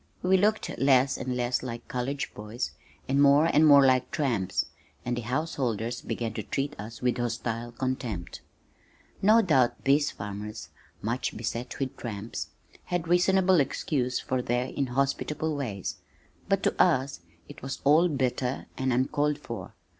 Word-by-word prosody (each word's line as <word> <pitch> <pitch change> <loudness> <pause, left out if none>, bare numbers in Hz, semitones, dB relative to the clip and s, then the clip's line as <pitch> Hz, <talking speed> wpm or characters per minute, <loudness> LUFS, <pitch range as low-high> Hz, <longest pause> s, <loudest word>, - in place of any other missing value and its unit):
We 185 +1 +4
looked 210 +3 +1
less 135 0 +4
and 130 -1 -3
less 125 0 0
like 120 -2 -6
college 135 +3 -3
boys 105 - -4 0.4
and 140 +1 +2
more 145 +2 +6
and 160 -1 +5
more 140 -2 +8
like 130 -1 +3
tramps, 110 - 0 0.4
and 120 0 0
the 120 - -3
householders 120 -3 -2
began 115 -2 -3
to 110 - -3
treat 140 +7 -2
us 115 +4 -8
with 125 -1 +1
hostile 120 0 -2
contempt. 120 -7 -4 0.8
No 220 +3 +6
doubt 135 - +2
these 145 +2 +3
farmers, 105 -3 -7 0.3
much 115 +4 -2
beset 120 +2 -4
with 135 -2 -3
tramps, 110 -1 -5 0.4
had 175 -2 -2
reasonable 185 +1 +4
excuse 130 -2 0
for 130 -1 -1
their 125 +1 0
inhospitable 140 +4 -1
ways, 110 -9 -4 0.5
but 195 -1 +2
to - - +2
us 135 - +2 0.3
it - - -12
was 135 +1 -5
all 155 +5 +5
bitter 130 -2 -1
and 130 0 +1
uncalled 145 +4 +1
for. 115 -10 -8
130 Hz, 145 wpm, -28 LUFS, 120-145 Hz, 0.8 s, more